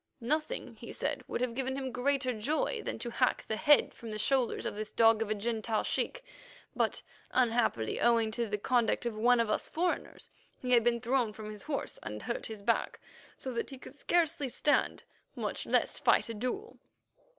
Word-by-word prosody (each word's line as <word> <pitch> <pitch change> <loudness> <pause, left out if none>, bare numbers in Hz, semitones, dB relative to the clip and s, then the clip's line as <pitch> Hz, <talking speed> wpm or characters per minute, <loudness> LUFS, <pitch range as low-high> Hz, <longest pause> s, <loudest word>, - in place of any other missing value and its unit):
Nothing, 310 - -2
he - - -9
said, - - -2
would - - -3
have 250 -2 0
given 265 +1 -2
him 265 -1 -3
greater 255 +1 +1
joy 300 - -1
than - - -3
to 240 - -4
hack 255 +1 +1
the 220 - -1
head 295 +4 +5
from 230 - -9
the 215 - -4
shoulders 250 +3 +1
of - - -2
this 215 0 -5
dog 225 -1 +5
of 225 - -1
a 215 - +1
Gentile 220 0 -1
sheik. - - -1 0.5
But, - - 0 0.3
unhappily, 230 - +1
owing 230 -2 +3
to 235 +1 -1
the 210 0 -1
conduct 240 +2 +1
of 235 -2 -2
one 240 +3 +4
of 230 -2 +1
us - - -1
foreigners, 350 +2 -2 0.3
he 250 - -4
had 240 -2 +6
been 235 0 +2
thrown 245 -2 +1
from 215 0 -7
his 210 -1 -8
horse, 280 +2 -4
and 105 0 -6
hurt 235 - -3
his 215 -2 -8
back, 230 +3 0 0.4
so 260 - -5
that 235 - -2
he 270 - -8
could 270 +2 -13
scarcely 325 -5 +1
stand, 290 +4 +1 0.3
much - - -2
less - - +2
fight - - +3
a - - -3
duel. 255 - -4
240 Hz, 195 wpm, -31 LUFS, 220-270 Hz, 0.5 s, had